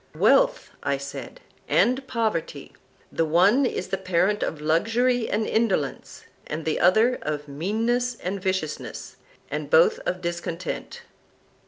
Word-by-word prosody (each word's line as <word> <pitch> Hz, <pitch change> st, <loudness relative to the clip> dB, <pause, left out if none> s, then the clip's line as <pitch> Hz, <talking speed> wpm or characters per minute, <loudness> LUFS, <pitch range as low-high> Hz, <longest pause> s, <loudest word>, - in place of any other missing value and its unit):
Wealth, -, -, +3 dB
I 140 Hz, -1 st, 0 dB
said, 140 Hz, +1 st, -8 dB, 0.3 s
and 255 Hz, +5 st, +2 dB
poverty; 170 Hz, -, -2 dB, 0.4 s
the 165 Hz, -, 0 dB
one 195 Hz, -, +4 dB
is 185 Hz, -, -4 dB
the 195 Hz, 0 st, -2 dB
parent 190 Hz, +2 st, +1 dB
of 155 Hz, -, -2 dB
luxury 225 Hz, +10 st, +1 dB
and 215 Hz, +1 st, 0 dB
indolence, 195 Hz, -13 st, -1 dB, 0.2 s
and 155 Hz, +1 st, -5 dB
the 160 Hz, -, 0 dB
other 220 Hz, +8 st, +4 dB
of 150 Hz, -1 st, -4 dB
meanness 225 Hz, -, -1 dB
and 195 Hz, -2 st, -4 dB
viciousness, 185 Hz, -5 st, -4 dB, 0.3 s
and -, -, -4 dB
both 485 Hz, -1 st, +5 dB
of 180 Hz, -, -1 dB
discontent. 170 Hz, 0 st, -5 dB
185 Hz, 130 wpm, -25 LUFS, 160-230 Hz, 0.4 s, both